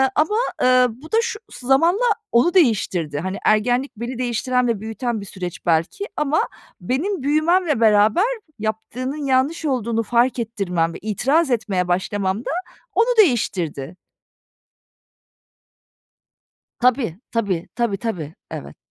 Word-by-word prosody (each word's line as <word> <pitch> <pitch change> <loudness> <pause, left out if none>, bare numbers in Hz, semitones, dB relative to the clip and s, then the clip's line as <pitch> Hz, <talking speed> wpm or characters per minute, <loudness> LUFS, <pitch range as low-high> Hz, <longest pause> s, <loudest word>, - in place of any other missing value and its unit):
ama, 365 +9 +2 0.2
eee, 255 0 +5
bu 260 +8 -12
da 445 - +3
şu 470 -2 -3
zamanla 330 - +2 0.3
onu 245 +9 +4
değiştirdi. 190 - +2
Hani, 190 +3 -3
ergenlik 245 +5 +2
beni 240 +2 -5
değiştiren 250 0 0
ve 225 -4 0
büyüten 225 0 -3
bir - - -8
süreç 180 -3 -7
belki 170 - +1
ama 300 +1 +2 0.4
benim 280 - -1
büyümemle 310 0 +2
beraber 215 - +5 0.4
yaptığının 250 +7 -4
yanlış 275 +5 +1
olduğunu 235 -4 0
fark 240 +2 +2
ettirmem 180 -7 -1
ve - - -7
itiraz 270 - +1
etmeye 195 -6 0
başlamam 190 +2 -1
da - - -2 0.4
onu 455 +2 +4
değiştirdi. 185 - +1 2.8
Tabii. 240 - +1
Tabii. 200 -7 -1
Tabii, 235 -5 0
tabii. 175 -9 -4 0.2
Evet. 70 +1 -7
235 Hz, 120 wpm, -21 LUFS, 200-275 Hz, 2.8 s, eee